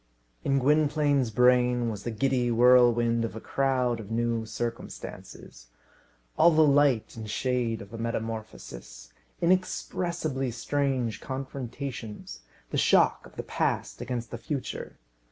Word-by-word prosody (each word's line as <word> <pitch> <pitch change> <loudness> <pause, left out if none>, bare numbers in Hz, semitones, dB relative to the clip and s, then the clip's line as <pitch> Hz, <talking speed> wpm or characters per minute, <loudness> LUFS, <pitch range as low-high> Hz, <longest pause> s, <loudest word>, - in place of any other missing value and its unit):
In 140 - +2
Gwynplaine's 145 -1 +2
brain 125 0 +3
was 105 -2 -6
the 120 - -4
giddy 125 +2 0
whirlwind 120 -1 +4
of 115 - -4
a - - -5
crowd 130 -2 0
of 105 -3 -9
new 115 0 -1
circumstances; 110 - -7 0.7
all - - +8
the 160 -1 +5
light 140 -5 +3
and 110 -1 -7
shade 120 -1 -1
of 100 - -16
a 115 - -6
metamorphosis; 110 - -6 0.3
inexpressibly 170 -5 0
strange 125 -2 -1
confrontations; 130 - -6 0.3
the - - 0
shock - - +3
of - - -20
the - - -5
past - - -2
against 120 -1 -4
the 120 - -6
future. 140 +3 -5
120 Hz, 125 wpm, -27 LUFS, 115-135 Hz, 0.7 s, all